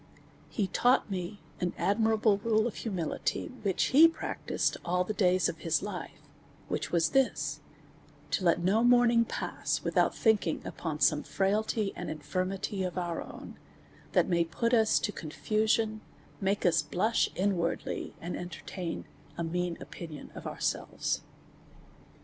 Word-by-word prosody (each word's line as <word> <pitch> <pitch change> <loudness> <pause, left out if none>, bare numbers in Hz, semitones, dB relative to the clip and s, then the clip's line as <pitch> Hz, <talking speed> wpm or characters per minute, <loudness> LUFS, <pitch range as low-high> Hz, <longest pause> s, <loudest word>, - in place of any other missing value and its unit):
He 210 - 0
taught 245 +4 +2
me 185 +2 -4 0.2
an 180 -1 -1
admirable 220 0 +2
rule 220 0 +2
of 240 - -1
humility, 185 -8 -2
which 195 -4 +1
he 315 +5 +9
practised 330 - -2
all 180 +1 +1
the 215 - -3
days 185 -3 +3
of - - -4
his - - 0
life; - - -6 0.5
which - - -2
was 170 -1 +3
this: 270 -1 +1 0.7
to 190 - 0
let 170 -1 +3
no 205 +6 +3
morning 240 -1 +5
pass - - -2
without - - +2
thinking 210 -8 +2
upon 155 -3 -4
some 150 -1 +4
frailty 210 +1 0
and 175 -3 -5
infirmity 185 +6 -2
of 180 -1 -3
our 175 -2 -2
own, - - -10 0.5
that - - +4
may 170 -2 +3
put 200 +9 -1
us 220 -2 +5
to 205 - 0
confusion, 215 +6 0 0.4
make 200 +1 0
us 175 - +4
blush 185 +9 +1
inwardly, 180 -3 -1
and 175 +2 -4
entertain 175 0 -5 0.3
a 170 - -1
mean 175 +1 -2
opinion 160 -4 -9
of - - -7
ourselves. - - -2
190 Hz, 140 wpm, -30 LUFS, 175-220 Hz, 0.7 s, he